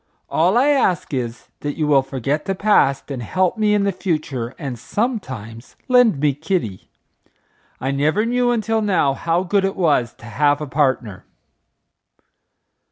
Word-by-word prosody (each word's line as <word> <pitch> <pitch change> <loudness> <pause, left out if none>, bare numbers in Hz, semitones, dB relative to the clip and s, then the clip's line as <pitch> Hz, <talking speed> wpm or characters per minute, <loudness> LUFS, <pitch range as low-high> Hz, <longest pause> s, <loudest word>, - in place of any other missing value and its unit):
All 180 +7 +3
I 270 +4 +4
ask 190 - +1
is, 120 -2 -4
that 145 0 -4
you 155 - 0
will 145 -2 +4
forget 135 +3 -3
the 195 0 -1
past 165 -10 +2
and 130 -3 -4
help 185 +10 0
me 210 -1 +2
in 205 - +2
the 200 - +1
future 155 - -3
and 135 -7 -5
sometimes 130 - -4
lend 245 - +4
me 145 0 +2
Kitty. 145 - -3 0.9
I 135 - -2
never 155 +10 +1
knew 245 +1 +1
until 225 -1 0
now 180 -9 +2
how 170 +5 0
good 195 +2 +1
it 195 0 -1
was 145 -9 +1
to - - -15
have 145 +4 +1
a 150 - -4
partner." 130 -8 -1
155 Hz, 160 wpm, -20 LUFS, 135-200 Hz, 0.9 s, I